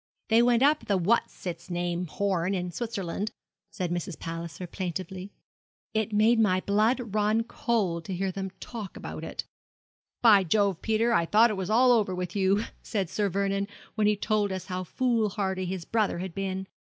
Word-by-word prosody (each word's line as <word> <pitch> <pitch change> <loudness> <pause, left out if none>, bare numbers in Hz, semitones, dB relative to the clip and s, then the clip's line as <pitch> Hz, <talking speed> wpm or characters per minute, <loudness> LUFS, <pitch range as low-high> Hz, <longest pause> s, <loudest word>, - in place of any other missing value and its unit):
'They 225 +1 +6
went 240 +1 +4
up 300 +2 +3
the 200 - +2
what's 195 +5 0
its 170 -1 -5
name 175 0 -2
Horn, 190 +1 0
in 180 -1 -3
Switzerland,' 205 -2 -3 0.4
said 180 -2 -3
Mrs. 175 -1 -3
Palliser, 165 +1 -6
plaintively. 185 +2 -5 0.6
'It 220 -1 0
made 220 +3 +4
my 185 -4 +3
blood 215 +3 +1
run 215 +2 +2
cold 205 -8 -1
to 190 - -3
hear 190 +1 -1
them 190 +1 -4
talk 220 -5 -7
about - - -7
it. - - -4 0.8
"By 210 -4 +7
Jove, 200 0 +1
Peter, 225 +2 +2
I 170 -6 +2
thought 225 +4 +5
it - - -2
was 190 0 -3
all 250 +3 +5
over 210 -6 +2
with 180 0 -4
you," 200 +2 +2 0.2
said 195 -6 -2
Sir 205 -2 0
Vernon, 195 +1 0 0.3
when 215 -1 +2
he 210 - +4
told 205 0 0
us 185 -1 -4
how 185 -1 -3
foolhardy 205 -4 0
his 180 -2 -4
brother 215 -4 +1
had 185 0 -5
been. 190 0 -3
195 Hz, 180 wpm, -28 LUFS, 180-220 Hz, 0.8 s, By